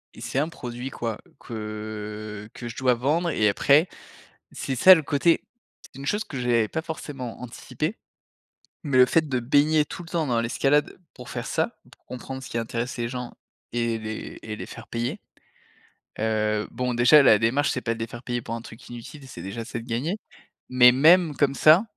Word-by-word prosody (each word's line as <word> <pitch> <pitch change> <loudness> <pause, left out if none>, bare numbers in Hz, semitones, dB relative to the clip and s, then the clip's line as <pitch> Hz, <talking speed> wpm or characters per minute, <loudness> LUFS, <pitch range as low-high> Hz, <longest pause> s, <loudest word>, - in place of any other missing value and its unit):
Et - - -12
c'est - - -4
un 155 +3 0
produit, 125 -4 -6
quoi, 115 -2 -4 0.2
que 105 -1 -6
que 120 - -7
je 115 - -7
dois 130 -1 +3
vendre 150 +8 0
et 105 -7 +3
après 140 - +4 0.7
c'est 135 - -4
ça 185 +9 +9
le 160 - 0
côté 150 +3 +2 0.4
c'est - - -15
une 135 - -7
chose 210 +7 0
que 140 - -7
j'avais 120 -3 +2
pas 160 - -3
forcément 140 -7 -7
anticipée, 130 - -4 0.9
mais 140 -5 +1
le 125 - +8
fait 160 +4 +2
de 130 -2 0
baigner 145 +5 +3
tout 175 - -8
le 165 - -13
temps 165 -2 0
dans 120 -2 +1
l'escalade 135 +5 +1 0.2
pour 125 - -11
faire - - -5
ça, - - -1
pour - - -22
comprendre 130 +1 -7
ce - - -9
qui - - -3
intéresse 115 +2 -3
les 120 -1 -1
gens 125 -1 -6 0.4
et 115 -1 0
les 110 0 -6
et 110 -1 -6
les - - -7
faire 120 - -11
payer, 120 - -3 1.0
heu, 110 -1 0
bon, 125 0 -2
déjà 125 +5 +7
la 110 -5 +6
démarche, 125 +6 +2
c'est 130 - -2
pas 115 - -1
de 115 - -11
les 115 - -3
faire 120 +2 -10
payer 120 -1 -2
pour 115 - -5
un 115 - -8
truc 115 +1 -13
inutile, 125 +4 -10
c'est - - -9
déjà 100 +4 -5
c'est 120 0 -5
de 115 - -12
gagner. 150 - -2 0.5
Mais 125 -1 +7
même 160 +4 +5
comme 140 0 +1
ça, 155 +8 +6
125 Hz, 200 wpm, -25 LUFS, 115-145 Hz, 1.0 s, ça